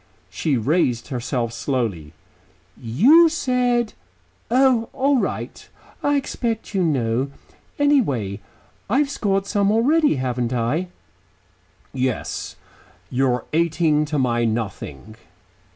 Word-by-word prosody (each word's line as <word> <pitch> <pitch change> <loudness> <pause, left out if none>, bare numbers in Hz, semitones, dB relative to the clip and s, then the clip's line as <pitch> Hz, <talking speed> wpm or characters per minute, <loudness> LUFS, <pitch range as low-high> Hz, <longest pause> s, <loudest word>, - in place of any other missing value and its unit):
She 140 - 0
raised 125 -1 0
herself 120 -2 -2
slowly. 110 - -3 0.6
"You 255 - +5
said 250 -6 0 0.6
Oh, 250 -2 +3
all 275 0 +2
right, - - -4 0.3
I 290 0 +2
expect 235 -6 -3
you 195 - +1
know. 130 -4 0 0.5
Anyhow, 145 - +1 0.5
I 235 - +2
have 285 -1 +1
scored 195 -6 0
some 200 0 +1
already, 290 - +3
haven't 125 -2 -2
I?" 125 +10 0 1.1
"Yes. 130 -4 -3 0.6
You're 125 -2 +1
eighteen 160 -2 +2
to 150 0 -3
my 120 -3 +1
nothing." 110 - -4
150 Hz, 105 wpm, -22 LUFS, -, 1.1 s, You